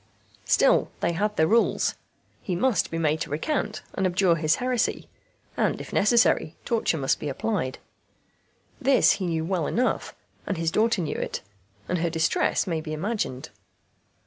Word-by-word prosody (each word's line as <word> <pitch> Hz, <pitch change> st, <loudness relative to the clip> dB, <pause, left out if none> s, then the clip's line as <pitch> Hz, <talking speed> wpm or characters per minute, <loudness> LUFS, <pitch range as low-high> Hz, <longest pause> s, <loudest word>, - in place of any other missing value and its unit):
Still, -, -, +3 dB
they 170 Hz, -, +1 dB
had 210 Hz, +5 st, -1 dB
their 160 Hz, -, +4 dB
rules; 230 Hz, +7 st, +2 dB, 0.5 s
he 180 Hz, -, -3 dB
must 225 Hz, 0 st, +1 dB
be 165 Hz, -, -4 dB
made 155 Hz, -1 st, 0 dB
to -, -, -3 dB
recant 210 Hz, -, -2 dB
and 190 Hz, -, +1 dB
abjure 180 Hz, -1 st, +3 dB
his 155 Hz, -1 st, +2 dB
heresy; 250 Hz, -1 st, -1 dB, 0.5 s
and, -, -, 0 dB
if -, -, -9 dB
necessary, 220 Hz, -7 st, +3 dB
torture 225 Hz, -8 st, 0 dB
must 135 Hz, -3 st, 0 dB
be 150 Hz, -, -4 dB
applied. 165 Hz, -4 st, -2 dB, 1.0 s
This 270 Hz, 0 st, +5 dB
he 190 Hz, -3 st, -1 dB
knew 160 Hz, -1 st, -1 dB
well 175 Hz, -3 st, -1 dB
enough, 250 Hz, +3 st, -1 dB, 0.3 s
and 195 Hz, -, -1 dB
his 165 Hz, 0 st, 0 dB
daughter 220 Hz, -2 st, +2 dB
knew 150 Hz, -, -3 dB
it, -, -, -3 dB, 0.5 s
and 180 Hz, -, -1 dB
her 170 Hz, +1 st, 0 dB
distress 160 Hz, +3 st, +1 dB
may 165 Hz, -4 st, -2 dB
be 155 Hz, -1 st, -6 dB
imagined. 155 Hz, -, -3 dB
175 Hz, 160 wpm, -25 LUFS, 160-215 Hz, 1.0 s, This